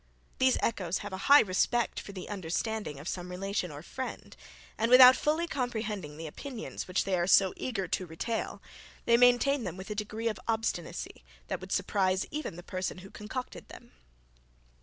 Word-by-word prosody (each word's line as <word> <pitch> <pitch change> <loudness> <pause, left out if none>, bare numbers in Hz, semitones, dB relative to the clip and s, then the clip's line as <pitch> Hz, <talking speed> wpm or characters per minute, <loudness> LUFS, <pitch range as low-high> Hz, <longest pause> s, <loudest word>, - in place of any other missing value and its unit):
These 260 0 +4
echoes 185 -5 0
have 205 - -6
a 190 +6 -4
high 285 +1 +10
respect 220 +4 +1
for - - -9
the 190 -2 -8
understanding 195 -3 -3
of 150 - -9
some 180 -1 -4
relation 185 0 -2
or 145 0 -9
friend, 260 +8 -7 0.4
and 225 +1 0
without 255 +1 +10
fully 310 +3 +1
comprehending 220 - -3
the 165 - -6
opinions, 230 - -6
which 180 +1 +1
they 195 -1 0
are 175 0 0
so 190 -1 +5
eager 200 -8 -3
to 185 - -2
retail, 225 +8 -4 0.4
they 235 - +5
maintain 245 +2 +4
them 180 -3 -5
with 190 +3 -8
a - - 0
degree 215 +2 -3
of 220 - -2
obstinacy, 220 - -3 0.3
that - - -3
would - - -9
surprise 190 -2 +1
even 300 - -4
the 175 - -9
person 185 0 -4
who 195 - -12
concocted 245 +5 -7
them. - - -13
205 Hz, 180 wpm, -30 LUFS, 185-240 Hz, 0.4 s, high